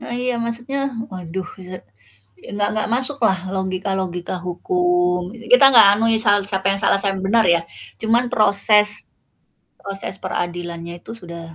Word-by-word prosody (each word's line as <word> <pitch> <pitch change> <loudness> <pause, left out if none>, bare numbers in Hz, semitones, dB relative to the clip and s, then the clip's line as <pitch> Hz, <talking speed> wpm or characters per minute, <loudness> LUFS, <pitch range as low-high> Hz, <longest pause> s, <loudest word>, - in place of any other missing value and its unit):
Nah, - - -8
iya. 250 0 -1
Maksudnya, 240 +4 -3 0.3
waduh, 185 0 -6 0.2
eee, 185 0 -9 0.7
enggak 205 0 -1
enggak 215 0 -2
masuklah 255 -6 +1 0.2
logika-logika 185 -1 -3
hukum 180 0 0 0.3
Kita 250 +2 +7
enggak 225 -5 +7
anui 225 +1 +1
sal 205 -1 +4
siapa 190 -1 -3
yang 195 - -3
salah, - - +3
siapa 195 -1 0
yang 190 - -6
benar, 225 +1 +3
ya. - - -2 0.4
Cuman, 230 +2 +2
proses 210 0 +4 0.9
proses 195 -1 -4
peradilannya 170 -1 -5
itu 175 - -12
sudah, 170 -1 -9
195 Hz, 140 wpm, -19 LUFS, 180-225 Hz, 0.9 s, Kita